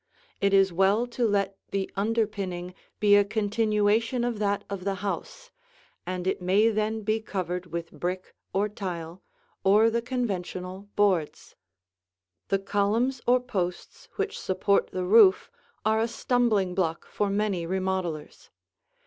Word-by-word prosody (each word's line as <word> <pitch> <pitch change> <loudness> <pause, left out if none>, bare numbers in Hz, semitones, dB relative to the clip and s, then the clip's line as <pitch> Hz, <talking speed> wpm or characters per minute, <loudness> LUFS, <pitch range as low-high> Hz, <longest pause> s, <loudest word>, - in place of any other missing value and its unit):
It 200 - +2
is 195 -2 +4
well 195 +6 +3
to 240 -1 -1
let 200 -2 0
the 195 -1 -1
underpinning 200 -4 -2 0.3
be 205 -1 +6
a 205 - +6
continuation 215 +2 +1
of 240 -3 -2
that 205 -1 0
of 200 -2 -5
the 195 0 -1
house, - - -5 0.6
and 180 -1 -3
it 190 - -1
may 195 +5 +4
then 215 0 -1
be 215 +2 +1
covered 180 -3 -4
with 170 -1 -5
brick 185 +1 -4 0.2
or 200 +2 +1
tile, 180 -4 -6 0.4
or 210 +4 +5
the 235 +1 0
conventional 195 -5 -4
boards. 190 -7 0 0.9
The 195 - +2
columns 210 +6 0
or 250 +1 +5
posts 190 -8 -4
which 410 0 -2
support 190 +1 +1
the 185 -1 -3
roof 200 -1 +5 0.3
are 220 0 +3
a 225 - +1
stumbling 225 -5 +1
block 170 -3 -1
for 205 - -2
many 200 -4 -1
remodelers. 185 -4 -3
200 Hz, 140 wpm, -27 LUFS, 185-220 Hz, 0.9 s, be